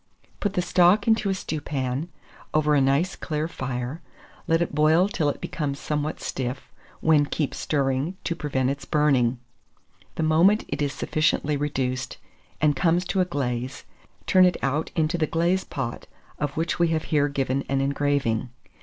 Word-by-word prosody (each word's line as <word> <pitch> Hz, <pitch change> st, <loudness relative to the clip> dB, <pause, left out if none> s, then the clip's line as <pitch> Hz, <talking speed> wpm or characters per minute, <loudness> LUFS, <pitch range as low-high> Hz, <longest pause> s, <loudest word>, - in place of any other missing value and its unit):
Put 205 Hz, -2 st, -1 dB
the 180 Hz, -, 0 dB
stock 185 Hz, +4 st, +4 dB
into 220 Hz, -2 st, +3 dB
a 195 Hz, -, +1 dB
stewpan, 145 Hz, -4 st, -3 dB, 0.5 s
over 150 Hz, -1 st, +3 dB
a 145 Hz, -, +4 dB
nice 140 Hz, +7 st, +2 dB
clear 155 Hz, 0 st, -3 dB
fire; 130 Hz, 0 st, -4 dB, 0.5 s
let 165 Hz, 0 st, +3 dB
it 170 Hz, -, -1 dB
boil 155 Hz, +5 st, +4 dB
till 160 Hz, -7 st, 0 dB
it -, -, -4 dB
becomes 140 Hz, -3 st, -3 dB
somewhat 150 Hz, 0 st, -2 dB
stiff, 130 Hz, +1 st, -4 dB, 0.3 s
when 150 Hz, -2 st, +4 dB
keep 150 Hz, -1 st, -2 dB
stirring, 140 Hz, +4 st, -1 dB
to 170 Hz, -, -2 dB
prevent 135 Hz, -5 st, 0 dB
its 140 Hz, 0 st, -5 dB
burning. 135 Hz, -5 st, +2 dB, 0.8 s
The 160 Hz, -, -1 dB
moment 170 Hz, +7 st, +4 dB
it -, -, -3 dB
is 145 Hz, -1 st, +1 dB
sufficiently 155 Hz, 0 st, 0 dB
reduced, 130 Hz, -3 st, -2 dB, 0.4 s
and 150 Hz, -1 st, +3 dB
comes 175 Hz, +3 st, +2 dB
to 190 Hz, -, +1 dB
a -, -, +2 dB
glaze, 130 Hz, -6 st, -3 dB, 0.4 s
turn 185 Hz, -, +5 dB
it 180 Hz, -, +2 dB
out 145 Hz, +4 st, 0 dB
into 160 Hz, +1 st, +1 dB
the 155 Hz, -, +2 dB
glaze 170 Hz, +4 st, +1 dB
pot, 135 Hz, -6 st, -5 dB, 0.3 s
of 145 Hz, 0 st, -3 dB
which 165 Hz, +2 st, -1 dB
we 170 Hz, -, +4 dB
have 160 Hz, -1 st, 0 dB
here 145 Hz, -1 st, +4 dB
given 135 Hz, -1 st, -1 dB
an 135 Hz, 0 st, +1 dB
engraving. 140 Hz, -4 st, 0 dB
150 Hz, 165 wpm, -25 LUFS, 135-165 Hz, 0.8 s, turn